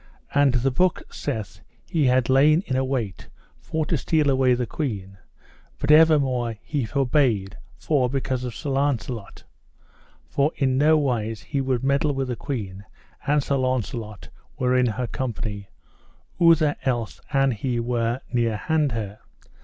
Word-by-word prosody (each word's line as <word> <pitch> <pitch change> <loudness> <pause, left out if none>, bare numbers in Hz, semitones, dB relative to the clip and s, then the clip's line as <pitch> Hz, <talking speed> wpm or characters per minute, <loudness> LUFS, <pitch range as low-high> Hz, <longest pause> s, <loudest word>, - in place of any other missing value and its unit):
And 140 -2 +4
the 130 +2 +2
book 180 +7 +1
saith 110 -9 -5 0.3
he 155 -4 +1
had 125 -1 +3
lain 150 +6 +4
in 130 - -2
await 130 -7 -2 0.3
for 160 -1 -2
to 165 - 0
steal 150 +1 +1
away 130 -2 +3
the 125 0 -1
queen, 100 - -5 0.6
but - - +1
evermore 135 -7 +4
he 145 -5 -2
forbare 125 -4 +1 0.3
for 135 -5 +1
because 130 -1 -2
of 125 -3 -5
Sir 145 - -4
Launcelot; 125 -6 -2 0.8
for 140 +2 +1
in 130 -2 +1
no 155 +3 +4
wise 115 -7 -1
he 140 -2 -2
would 130 -2 -1
meddle 140 +1 +1
with 135 -1 -2
the 125 - -1
queen 100 -8 -5 0.4
an 145 +1 +3
Sir 140 0 0
Launcelot 120 -5 -3 0.3
were 125 0 +1
in 125 -1 +3
her 125 +2 -2
company, 110 -6 -4 0.7
outher 160 -3 +5
else 120 -4 -2
an 135 -1 +3
he 120 +2 -2
were 120 +1 -1
near 115 -3 +1
hand 155 0 0
her. 105 -2 -5
130 Hz, 150 wpm, -24 LUFS, 115-140 Hz, 0.8 s, outher